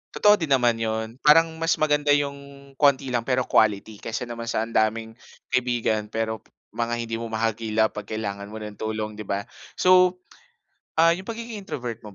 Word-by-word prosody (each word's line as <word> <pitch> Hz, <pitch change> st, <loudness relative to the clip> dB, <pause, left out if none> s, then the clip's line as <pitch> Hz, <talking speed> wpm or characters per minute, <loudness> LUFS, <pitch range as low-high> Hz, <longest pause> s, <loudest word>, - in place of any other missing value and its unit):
Totoo 210 Hz, 0 st, +6 dB
din 160 Hz, -7 st, -4 dB
naman 120 Hz, -3 st, +4 dB
'yun, 110 Hz, 0 st, -3 dB
parang 160 Hz, +2 st, +5 dB
mas 165 Hz, +1 st, 0 dB
maganda 150 Hz, -1 st, +2 dB
'yung 145 Hz, -1 st, +2 dB, 0.4 s
konti 140 Hz, -1 st, +3 dB
lang 120 Hz, -2 st, -1 dB
pero 130 Hz, 0 st, 0 dB
quality 105 Hz, 0 st, +2 dB
kaysa 115 Hz, +2 st, -4 dB
naman 115 Hz, 0 st, -6 dB
sa 115 Hz, -1 st, -1 dB
ang 115 Hz, -, -11 dB
daming 110 Hz, +1 st, +1 dB, 0.3 s
kaibigan 120 Hz, -4 st, 0 dB
pero 110 Hz, -1 st, -3 dB, 0.3 s
mga 120 Hz, 0 st, -1 dB
hindi 115 Hz, -1 st, -3 dB
mo 115 Hz, 0 st, -5 dB
mahagilap 110 Hz, 0 st, 0 dB
'pag 105 Hz, -1 st, -6 dB
kailangan 100 Hz, -1 st, -4 dB
mo 110 Hz, -, -7 dB
ng 105 Hz, -1 st, -8 dB
tulong, 110 Hz, 0 st, -4 dB
di 105 Hz, -, -7 dB
ba? 100 Hz, 0 st, -3 dB, 0.3 s
So, 180 Hz, 0 st, +5 dB, 0.8 s
ah, 165 Hz, +1 st, +5 dB
'yung 185 Hz, +3 st, -2 dB
pagiging 230 Hz, -1 st, -6 dB
introvert 125 Hz, -, -5 dB
mo 105 Hz, -, -11 dB
115 Hz, 180 wpm, -24 LUFS, 110-145 Hz, 0.8 s, Totoo